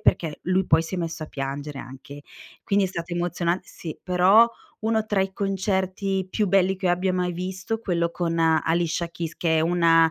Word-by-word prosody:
perché 160 -3 +1
lui 185 +1 +1
poi 160 +1 +4
si 165 +3 -6
è - - -2
messo 165 -1 -4
a 155 - -5
piangere 140 +1 -5
anche. 135 +3 -10 0.4
Quindi 200 0 +2
è - - -6
stato 170 -1 -6
emozionan 175 0 0
sì, 165 -3 -8
però 190 +6 +5 0.3
uno 220 0 +1
tra 210 -2 0
i 190 0 0
concerti 190 -1 -1
più 210 -2 +1
belli 190 0 +3
che 185 0 -3
io 175 - +4
abbia 185 +1 0
mai 180 -1 0
visto, 190 +5 -4
quello 170 -5 0
con 170 -1 -2
Alicia 165 +1 +1
Keys 165 -1 -5
che 160 -2 +1
è - - +3
una 165 -1 +4
175 Hz, 195 wpm, -24 LUFS, 165-190 Hz, 0.4 s, però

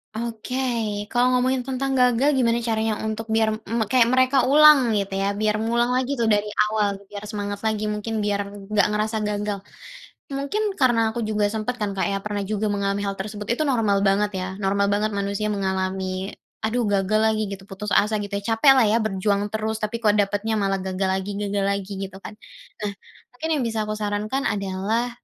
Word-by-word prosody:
Oke, 235 +2 -4 0.6
kalau 245 0 +3
ngomongin 255 +1 +2
tentang 270 +1 -2
gagal 250 +3 +4
gimana 235 -1 +2
caranya 220 -1 0
untuk 220 +1 -3
biar 220 -1 +3
me 220 +1 -2
kayak 245 -3 +5
mereka 260 +1 +3
ulang 285 -5 +7
gitu 195 -1 -1
ya, 195 +1 -1
biar 215 0 +1
ngulang 235 +2 +1
lagi 260 +2 0
tuh 235 - -1
dari 210 0 +2 0.2
awal, 205 -2 +1
biar 205 0 -8
semangat 205 -1 -4
lagi 215 -1 -1
mungkin, 210 0 -3
biar 200 -1 -1 0.2
gak 210 -1 +4
ngerasa 215 +1 0
gagal. 205 -1 -2 0.7
Mungkin 385 +10 -2
karena 230 -4 +3
aku 230 0 -3
juga 210 -1 +1
sempet 220 +2 -3
kan, 200 -2 -2
Kak, - - +1
ya 195 - 0
pernah 205 -1 -3
juga 210 +1 -1
mengalami 200 0 -1
hal 200 -1 -3
tersebut. 205 +1 -6
Itu 310 - 0
normal 215 -7 +2
banget 200 +1 +3
ya, 185 0 -3
normal 200 +1 +2
banget 210 +1 +1
manusia 200 +2 -1
mengalami 190 -1 -2 0.4
aduh 240 +3 0
gagal 200 +2 +2
lagi 215 - -1
gitu, 195 -1 -7
putus 200 +2 -5
asa 210 +1 +3
gitu 200 0 -7
ya, - - -4
capek 270 +5 +6
lah 240 - +5
ya 220 - +3
berjuang 205 0 0
terus 220 0 -1
tapi 215 +2 -2
kok 210 -3 +4
dapetnya 205 +2 0
malah 195 -1 +1
gagal 190 0 -2
lagi 190 +1 -2
gagal 200 0 -1
lagi 200 0 -2
gitu 190 0 -10
kan. - - -8 0.5
Nah, - - 0 0.4
mungkin 320 +6 -5
yang 285 - 0
bisa 225 -1 -1
aku 215 - -3
sarankan 210 +6 -2
adalah, 200 +4 -1
215 Hz, 190 wpm, -23 LUFS, 200-230 Hz, 0.7 s, ulang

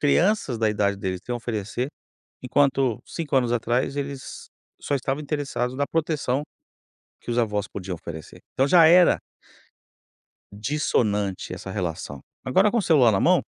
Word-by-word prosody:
crianças 150 - +2
da 110 -1 +2
idade 100 -1 +1
deles 95 -2 -3
têm 125 - -6
a 120 - -1
oferecer, 115 +1 -3 0.6
enquanto 135 -2 +1
5 155 -4 -4
anos 125 -3 +2
atrás 120 +3 0
eles 140 -2 -6 0.3
só - - -3
estavam 140 +2 -1
interessados 140 -4 -2
na 140 +1 -1
proteção 150 -4 -1 0.8
que - - -7
os 120 - 0
avós 105 -3 0
podiam 95 -2 -5
oferecer. 80 -2 -9
Então 135 - +2
já 165 +2 +7
era 175 +2 +6 1.3
dissonante 105 -5 -1
essa 95 - -7
relação. 80 -8 -4 0.2
Agora 190 +11 +3
com 240 - +1
o - - +3
celular 145 - +5
na 95 - +2
mão - - +4
125 Hz, 150 wpm, -24 LUFS, 105-145 Hz, 1.3 s, já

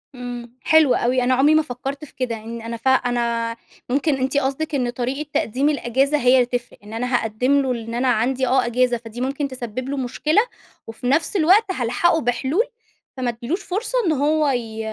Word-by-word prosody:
إمم. 245 -1 -7
حلو 315 -5 +5
أوي. 250 +2 +1
أنا 255 +1 +2
عُمري 280 +4 +4
ما 310 - +5
فكّرت 275 +1 -6
في - - -19
كده 250 -3 -2
إن 225 +1 -7
أنا 230 +1 -5
ف 230 - -5
أنا 235 -3 +1 0.3
ممكن 285 +3 +1
أنتِ 265 +2 -1
قصدِك 285 +3 -1
إن 250 -3 0
طريقة 260 +5 -3
تقديم 265 +6 +1
الأجازة 275 +1 +1
هي 250 -2 +4
اللي 250 -1 +4
تفرق. 245 0 -5
إن 210 +1 -11
أنا 250 +3 -2
هاقدّم 250 +5 +1
له 265 -2 -1
إن 230 -1 -4
أنا 245 +2 0
عندي 255 +2 +1
آه 255 +1 +3
أجازة، 245 +1 +1
فدي 230 +1 -9
ممكن 275 +2 -1
تسبّب 255 -1 -6
له 280 - -2
مشكلة 300 - +1 0.5
وفي 225 +3 -6
نفس 310 +9 +1
الوقت 380 +5 +5
هالحقه 320 +4 +1
بحلول 260 - +1 0.5
فما 255 -1 -1
أدّيلوش 240 - -3
فرصة 415 +7 -3
إنه 320 -3 +2
هو 305 -1 +2
ي 230 -4 -3
255 Hz, 195 wpm, -21 LUFS, 240-285 Hz, 0.5 s, حلو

